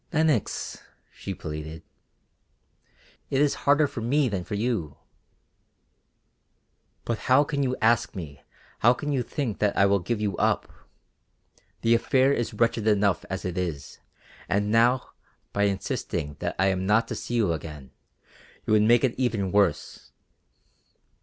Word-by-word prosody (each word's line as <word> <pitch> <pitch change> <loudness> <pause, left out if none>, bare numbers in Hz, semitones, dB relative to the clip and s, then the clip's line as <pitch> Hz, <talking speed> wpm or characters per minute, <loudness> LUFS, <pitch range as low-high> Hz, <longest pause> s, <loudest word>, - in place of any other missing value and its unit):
"Lenox," 155 - 0 0.3
she 95 - -6
pleaded, 80 0 -7 1.5
"it 135 - 0
is 145 -1 +3 0.2
harder 145 +1 +5
for 130 -4 -5
me 135 +5 +2
than 95 -4 -3
for 105 - -5
you." 100 - -2 2.1
"But 115 -2 -2
how 130 +3 +6
can 140 -1 -2
you 130 -2 0
ask 115 0 +2
me, 75 -7 -8 0.4
how 120 +2 +5
can 150 +2 -4
you 135 -3 +1
think 125 -3 -3
that 105 -1 +1
I 100 - +5
will 100 0 +3
give 105 +5 -2
you 105 -3 -1
up? - - 0 1.1
The 115 - +3
affair 130 +3 +3
is 120 -4 -1
wretched 115 -2 +1
enough 100 -4 +2
as 95 0 -4
it 90 0 -2
is, 75 -6 -5 0.5
and 105 +2 +1
now, 120 +3 +3 0.5
by 100 0 +2
insisting 95 -6 -3
that - - -3
I 95 - +2
am 95 0 -1
not 115 +3 +3
to - - -2
see 120 - -4
you 105 -8 +2
again, 75 -5 -8 0.7
you - - +1
would 105 - +5
make 115 +3 +4
it 130 -3 +2
even 110 -7 0
worse. 100 -7 0
105 Hz, 150 wpm, -26 LUFS, 95-120 Hz, 2.1 s, how